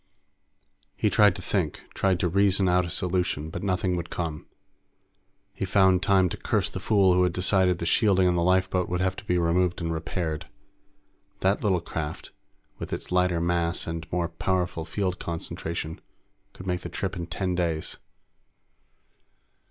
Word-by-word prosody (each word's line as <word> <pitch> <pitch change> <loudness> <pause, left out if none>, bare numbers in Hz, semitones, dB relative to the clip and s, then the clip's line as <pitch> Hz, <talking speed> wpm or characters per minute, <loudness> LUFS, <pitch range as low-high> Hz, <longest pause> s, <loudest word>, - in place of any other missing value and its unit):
He - - +1
tried 105 -4 +5
to 90 - -8
think, 85 -5 -1
tried 95 -2 +1
to 90 - +2
reason 95 +1 +3
out 90 -1 +3
a - - -6
solution, 90 -4 -1
but 90 - -5
nothing 90 -2 0
would 85 -1 -4
come. 80 -3 -4 1.1
He 100 - -5
found 95 -1 +4
time 95 -1 +4
to - - -5
curse - - 0
the - - -5
fool 100 -4 +4
who 90 - +3
had 90 -1 +2
decided 90 -1 +2
the 85 - -4
shielding 95 +1 +3
on 90 - +3
the 85 - +1
lifeboat 95 +1 +2
would 90 0 -1
have 95 0 0
to - - -8
be 90 - +1
removed 90 +1 +1
and 85 -1 -2
repaired. 80 -1 -3 0.9
That 95 +2 +2
little 95 -5 +2
craft, 80 -1 -5 0.5
with - - -6
its - - -5
lighter 90 -1 +2
mass 85 0 0
and 80 -1 -5
more 85 -1 0
powerful 90 -1 -1
field 90 +2 -2
concentration, 80 -1 -5 0.5
could 95 - -11
make 90 -1 -1
the - - -6
trip 100 0 -3
in 85 -2 -5
ten 95 -1 -2
days. 85 -3 -2
90 Hz, 165 wpm, -26 LUFS, 85-95 Hz, 1.1 s, tried